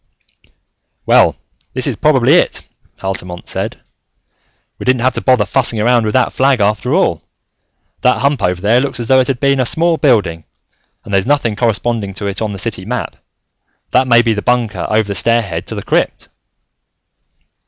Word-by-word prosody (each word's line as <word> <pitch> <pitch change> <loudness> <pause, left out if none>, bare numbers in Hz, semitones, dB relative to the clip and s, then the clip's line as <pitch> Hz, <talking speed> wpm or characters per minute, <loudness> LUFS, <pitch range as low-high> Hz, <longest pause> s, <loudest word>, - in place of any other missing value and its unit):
"Well, - - +4 0.4
this - - -1
is - - -1
probably - - +3
it," - - +1 0.4
Altamont 90 -2 -5
said. - - -4 1.0
"We - - -6
didn't 125 -2 +1
have 130 - +2
to - - -4
bother 125 -5 +3
fussing 115 +1 0
around 120 +1 +2
with 105 - -2
that 130 - +1
flag 135 -1 +2
after 105 -2 0
all. - - +1 0.8
That 125 -2 +3
hump 140 0 +1
over 90 0 0
there 110 +6 +2
looks 135 -2 -3
as 120 - -4
though 130 0 +5
it 130 - +1
had 130 -3 -2
been 140 -1 +2
a - - +3
small 165 +6 +1
building, 105 - +1 0.6
and 100 - -8
there's 95 +2 +1
nothing 140 -7 +1
corresponding 110 -2 -1
to 100 - -6
it 100 +1 -3
on 110 -1 -2
the 100 - -6
city 95 -2 -4
map. 125 +5 -4 0.8
That 130 +1 +2
may 120 -1 +5
be 115 -1 +1
the 105 - -3
bunker 120 -3 -1
over 110 -1 +1
the 100 - -3
stair 115 +5 +1
head 85 -5 -6
to - - -5
the - - -5
crypt." - - -1
115 Hz, 185 wpm, -15 LUFS, 100-130 Hz, 1.0 s, though